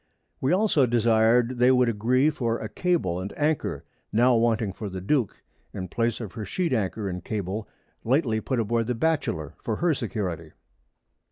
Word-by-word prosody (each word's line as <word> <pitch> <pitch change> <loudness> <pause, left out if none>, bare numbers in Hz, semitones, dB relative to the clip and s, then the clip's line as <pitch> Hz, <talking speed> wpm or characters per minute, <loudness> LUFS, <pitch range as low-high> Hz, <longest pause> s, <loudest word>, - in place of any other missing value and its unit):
We 130 - +1
also 180 -8 +3
desir'd 120 +1 +3
they 125 +1 +5
would 125 -1 +4
agree 125 +7 +2
for 115 -5 -1
a 110 - -5
Cable 130 - 0
and 95 +2 -5
Anchor, 150 - -1 0.3
now 120 +3 +4
wanting 115 -3 +1
for 105 +1 -6
the_ 95 -1 -7
Duke, 130 -4 0 0.3
in 95 -2 -5
Place 115 +2 -1
of 110 -6 -7
her 110 -2 -5
Sheet 170 - -1
Anchor 105 -2 -1
and 90 -2 -5
Cable, 105 +1 -4 0.4
lately 120 -3 +1
put 130 +1 -1
aboard 115 +1 0
the 125 - -1
Batchelor 115 - -1
_for 110 -2 -2
her 170 -1 +2
Security. 90 - -4
115 Hz, 170 wpm, -26 LUFS, 105-130 Hz, 0.4 s, they